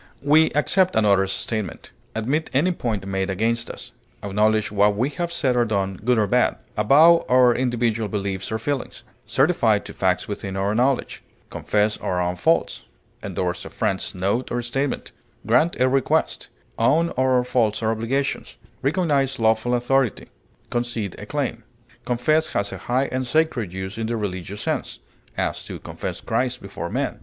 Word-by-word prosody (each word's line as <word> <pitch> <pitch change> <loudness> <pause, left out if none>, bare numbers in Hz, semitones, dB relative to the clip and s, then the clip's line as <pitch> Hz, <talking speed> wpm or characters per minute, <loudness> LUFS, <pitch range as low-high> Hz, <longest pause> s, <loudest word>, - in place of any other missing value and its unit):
We 155 +3 +5
accept 185 +5 +2
another's 100 -3 +3
statement; 105 -4 -4 0.2
admit 135 +9 -1
any 165 +7 +3
point 110 - -3
made 95 0 -2
against 115 +5 0
us; - - -9 0.3
acknowledge 105 +1 +1
what 105 0 +3
we 125 +7 0
have 170 +2 -3
said 135 -7 +1
or 120 - +4
done, 95 -4 -1
good 125 +1 +3
or 110 - +3
bad; 125 +5 +2 0.2
avow 155 - +6
our 125 -1 +6
individual 120 -3 0
beliefs 100 -1 -3
or 110 - 0
feelings; 135 +4 -4 0.2
certify 130 -7 +3
to - - -9
facts 90 -1 0
within 100 -2 -5
our 100 +2 0
knowledge; 125 +4 0 0.3
confess 105 0 0
our 90 - -1
own 90 0 0
faults; 85 -2 +1 0.4
endorse 90 -1 -3
a - - -8
friend's - - -2
note 100 +7 -1
or 120 0 -1
statement; 135 +4 -2 0.3
grant 125 +10 +2
a 130 - +4
request; 135 0 0 0.3
own 160 +9 +3
our 130 -1 +2
faults 115 -3 0
or 110 - +2
obligations; 125 +5 -2 0.2
recognize 140 -3 +1
lawful 110 +2 +2
authority; 125 0 0 0.4
concede 120 -5 -2
a - - -8
claim. - - -3 0.4
Confess 155 +6 +1
has 100 0 0
a - - -7
high 130 +3 +2
and 130 0 -2
sacred 125 - +1
use 95 +3 -6
in 110 - -2
the 115 0 -1
religious 100 -1 -4
sense; - - -2 0.4
as, - - -2
to - - -6
confess - - -6
Christ 125 -1 -1
before 95 -3 -6
men. - - -2
115 Hz, 160 wpm, -23 LUFS, 100-130 Hz, 0.4 s, avow